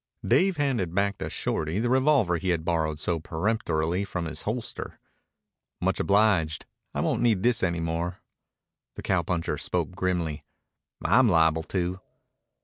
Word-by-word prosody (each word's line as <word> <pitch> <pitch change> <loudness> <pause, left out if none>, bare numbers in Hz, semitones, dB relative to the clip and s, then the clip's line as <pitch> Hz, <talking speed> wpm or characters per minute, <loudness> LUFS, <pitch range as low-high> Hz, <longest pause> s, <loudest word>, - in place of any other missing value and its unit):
Dave 190 -2 +3
handed 120 - 0
back 100 0 +1
to - - -3
Shorty 80 +4 -2
the 115 +3 +1
revolver 130 - +3
he 95 +2 -3
had 85 -2 0
borrowed 80 -3 0
so 85 +2 -1
peremptorily 85 0 -1
from 90 -3 -4
his 80 - -6
holster. 115 +2 -5 0.8
"Much - - 0
obliged. 100 -6 +2 0.3
I - - 0
won't - - 0
need 110 -6 +2
this 120 -2 +3
any 85 -2 0
more." 85 +2 -2 0.8
The - - -8
cowpuncher 85 -2 0
spoke - - -1
grimly. 90 -4 -2 0.6
"I'm 130 -3 +5
liable 80 -2 +3 0.2
to." 90 +1 -1
90 Hz, 140 wpm, -27 LUFS, 80-110 Hz, 0.8 s, I'm